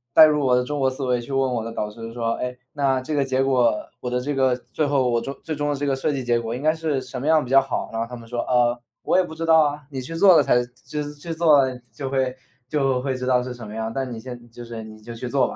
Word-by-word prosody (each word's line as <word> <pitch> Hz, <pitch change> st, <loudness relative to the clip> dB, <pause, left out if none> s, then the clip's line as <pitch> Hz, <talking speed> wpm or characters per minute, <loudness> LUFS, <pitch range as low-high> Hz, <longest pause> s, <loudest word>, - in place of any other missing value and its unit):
带 160 Hz, -, +11 dB
入 150 Hz, -1 st, +2 dB
我 125 Hz, -2 st, +4 dB
的 125 Hz, -, +2 dB
中 145 Hz, +3 st, -3 dB
国 135 Hz, -1 st, +3 dB
思 130 Hz, +1 st, -6 dB
维， 125 Hz, -1 st, +1 dB
去 120 Hz, -, -9 dB
问 135 Hz, -1 st, +1 dB
我 115 Hz, -2 st, -1 dB
的 115 Hz, -, -5 dB
导 105 Hz, -2 st, -3 dB
师 115 Hz, +1 st, -8 dB
说：” 115 Hz, -1 st, -1 dB
诶， 125 Hz, 0 st, -4 dB, 0.2 s
那 135 Hz, -3 st, +1 dB
这 155 Hz, +4 st, -5 dB
个 145 Hz, -2 st, +2 dB
结 130 Hz, -1 st, 0 dB
果， 125 Hz, -4 st, +3 dB, 0.3 s
我 125 Hz, -, -3 dB
的 125 Hz, 0 st, 0 dB
这 145 Hz, +4 st, -2 dB
个， 130 Hz, -2 st, +3 dB, 0.2 s
最 155 Hz, -, +1 dB
后 140 Hz, -3 st, +2 dB
我 120 Hz, 0 st, +1 dB
终 135 Hz, +4 st, -5 dB
最 160 Hz, -, -3 dB
终 145 Hz, 0 st, -1 dB
的 145 Hz, -, 0 dB
这 145 Hz, +1 st, -3 dB
个 140 Hz, -1 st, +1 dB
设 135 Hz, +3 st, -1 dB
计 135 Hz, -2 st, -3 dB
结 120 Hz, -1 st, +2 dB
果 115 Hz, 0 st, -4 dB
应 125 Hz, -, -6 dB
该 155 Hz, +1 st, +4 dB
是 160 Hz, -4 st, -1 dB
什 130 Hz, -1 st, -7 dB
么 145 Hz, -, -3 dB
样 155 Hz, -2 st, +4 dB
比 125 Hz, -, -8 dB
较 135 Hz, 0 st, +7 dB
好 135 Hz, -1 st, -3 dB
呢？” 115 Hz, 0 st, -1 dB
他 125 Hz, -, -6 dB
们 115 Hz, -1 st, -12 dB
说： 120 Hz, +1 st, -4 dB
“呃， 120 Hz, -1 st, +3 dB, 0.3 s
我 -, -, +2 dB
也 -, -, +4 dB
不 160 Hz, -3 st, -8 dB
知 165 Hz, +1 st, -3 dB
道 160 Hz, 0 st, +6 dB
啊， 145 Hz, -1 st, 0 dB
你 135 Hz, -2 st, -4 dB
去 145 Hz, +6 st, -7 dB
做 185 Hz, +1 st, +7 dB
了 -, -, +7 dB
才 125 Hz, -, +3 dB, 0.2 s
就 150 Hz, -1 st, -3 dB
是 145 Hz, -, -7 dB
去 150 Hz, +3 st, -8 dB
做， 160 Hz, -3 st, +5 dB, 0.3 s
就 135 Hz, -2 st, -5 dB
会 130 Hz, -1 st, 0 dB, 0.3 s
就 135 Hz, -2 st, +1 dB
会 135 Hz, -1 st, -1 dB
知 130 Hz, 0 st, -4 dB
道 125 Hz, -1 st, +3 dB
是 125 Hz, 0 st, -5 dB
什 120 Hz, -3 st, -9 dB
么 105 Hz, -, -8 dB
样， 110 Hz, 0 st, -3 dB
但 130 Hz, -1 st, -3 dB
你 115 Hz, -, -6 dB
现 120 Hz, 0 st, -9 dB
就 120 Hz, +1 st, -10 dB
是， 115 Hz, -1 st, -7 dB
你 110 Hz, 0 st, -11 dB
就 120 Hz, +2 st, -8 dB
去 115 Hz, +2 st, -6 dB
做 135 Hz, +1 st, +2 dB
吧。” -, -, -7 dB
130 Hz, 335 characters per minute, -23 LUFS, 120-145 Hz, 0.3 s, 带